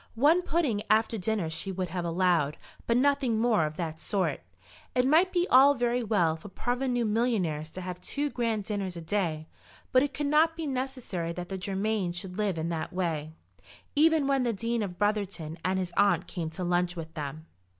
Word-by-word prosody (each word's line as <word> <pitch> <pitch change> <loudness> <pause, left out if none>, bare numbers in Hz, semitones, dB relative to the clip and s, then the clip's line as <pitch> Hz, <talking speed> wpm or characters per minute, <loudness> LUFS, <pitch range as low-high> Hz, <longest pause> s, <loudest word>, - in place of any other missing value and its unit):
One 305 +8 +5
pudding 310 - 0
after 220 +1 +3
dinner 205 -2 -1
she 160 +4 -3
would 185 -1 -3
have 175 0 -3
allowed, 170 -4 +1 0.3
but 235 - +3
nothing 270 -3 +2
more 220 -9 +3
of 150 - -8
that 160 -2 -4
sort. 185 -9 0 0.6
It 250 0 +3
might 325 +7 +4
be 355 0 +1
all 275 +3 +7
very 245 0 +1
well 200 -8 +2
for 165 +6 -11
parvenu 245 +3 -1
millionaires 210 -9 0
to 185 - -8
have 180 0 -6
two 290 0 -2
grand 230 -4 -1
dinners 195 -3 -3
a - - -6
day, 165 -3 -1 0.5
but 255 - +5
it 285 0 0
could 295 - -2
not 310 +3 +4
be 325 - -3
necessary 255 - -3
that 180 0 -6
the 195 - -3
Germains 195 -1 -1
should 180 0 -5
live 200 -5 0
in 160 +1 -2
that 165 -2 -3
way, 160 -4 -2 0.6
even 315 0 +4
when 275 -1 +2
the 240 -2 +1
Dean 230 +3 -1
of 185 -4 -4
Brotherton 200 -6 -1
and 185 +1 +1
his 180 -2 -3
aunt 200 0 +3
came 170 -4 -4
to 160 +3 -6
lunch 175 0 +1
with 160 -1 -7
them. 155 +1 -6
200 Hz, 195 wpm, -28 LUFS, 175-245 Hz, 0.6 s, all